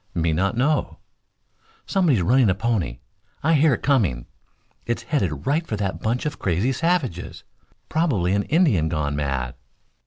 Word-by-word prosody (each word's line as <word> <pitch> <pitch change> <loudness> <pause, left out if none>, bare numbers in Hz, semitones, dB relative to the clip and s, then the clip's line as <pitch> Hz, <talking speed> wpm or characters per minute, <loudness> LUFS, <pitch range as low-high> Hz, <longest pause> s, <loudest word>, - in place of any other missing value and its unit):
"Me 80 -1 +1
not 95 +7 0
know." 150 +5 0 0.9
"Somebody's 160 - +2
running 125 +4 +4
a 95 - +2
pony. 100 - -1 0.5
I 160 +3 +3
hear 150 -3 +4
it - - -11
coming. 95 - +1 0.6
It's 120 0 -2
headed 95 - -2
right 155 +4 0
for 110 - -2
that 100 -2 -3
bunch 120 +5 -1
of 150 - -3
crazy 95 +8 0
savages. 140 - -1 0.4
Probably 120 - +1
an 100 - +2
Indian 110 - +2
gone 75 -3 -1
mad." 70 -4 -2
110 Hz, 150 wpm, -23 LUFS, -, 0.9 s, running